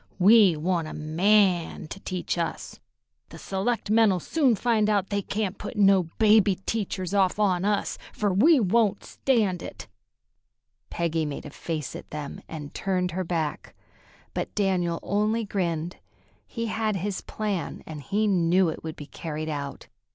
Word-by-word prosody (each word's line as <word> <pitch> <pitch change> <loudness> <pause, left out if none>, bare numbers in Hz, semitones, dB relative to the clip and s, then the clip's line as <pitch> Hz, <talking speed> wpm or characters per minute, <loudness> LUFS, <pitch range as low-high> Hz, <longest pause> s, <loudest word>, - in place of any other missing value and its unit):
"We 195 -3 +6
want 170 0 -1
a - - -7
man 175 +2 +2
to 195 - -7
teach 185 -2 -3
us. 170 -1 -4 0.5
The 165 - -11
selectmen'll 210 +1 +1
soon 265 - +2
find 220 -1 +1
out 200 -2 +1
they 200 0 +1
can't 200 0 -3
put 210 - -6
no 195 -4 +4
baby 215 -2 +5
teachers 195 -4 -2
off 195 -2 +2
on 190 -3 +2
us, 205 -1 0
fer 205 -2 0
we 285 - +5
won't 210 -1 +2
stand 210 -9 0
it." - - -8 1.0
Peggy 165 -1 -1
made 145 -2 -5
a 150 - -8
face 155 -2 -5
at - - -9
them 150 -2 -6
and 150 -3 -8
turned 185 -2 -1
her 185 +2 -2
back, 165 -3 -3 0.6
but - - -4
Daniel 180 -4 +1
only 215 +3 0
grinned. 175 -4 -2 0.5
He 230 -1 -4
had 220 -1 -1
his 195 +1 -3
plan, 205 -5 -4
and 155 -2 -7
he 205 +10 0
knew 180 -2 +3
it 160 - -6
would 160 -1 -5
be 145 - -9
carried 155 +1 -5
out. 140 -2 -5
190 Hz, 155 wpm, -26 LUFS, 165-210 Hz, 1.0 s, We